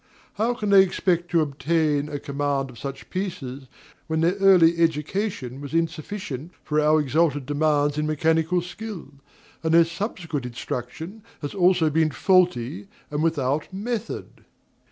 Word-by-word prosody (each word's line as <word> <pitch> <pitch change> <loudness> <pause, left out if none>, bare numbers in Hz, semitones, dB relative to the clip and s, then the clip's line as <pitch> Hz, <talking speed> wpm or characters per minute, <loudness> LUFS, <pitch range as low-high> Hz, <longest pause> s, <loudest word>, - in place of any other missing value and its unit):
How 235 +3 0
can 210 -4 -2
they 195 -1 +9
expect 175 -2 0
to 170 -2 +3
obtain 150 0 0
a 145 - -3
command 140 -1 -2
of 120 - -13
such 135 -1 -7
pieces, 140 -9 -4 0.4
when 160 0 0
their 170 +2 +3
early 180 -4 +5
education 160 - -1
was 145 +2 -6
insufficient 165 -2 -3
for 150 0 +1
our 155 +1 +4
exalted 145 -1 +1
demands 145 0 +1
in 150 - 0
mechanical 160 +3 +1
skill, 180 -2 -7 0.5
and 160 0 +2
their 170 0 +7
subsequent 165 - -4
instruction 125 - -6 0.2
has 145 - -4
also 180 -4 +3
been 160 +1 +3
faulty 135 - +2 0.2
and 145 0 -1
without 150 -2 0
method? 220 +3 -5
160 Hz, 140 wpm, -24 LUFS, 145-180 Hz, 0.5 s, they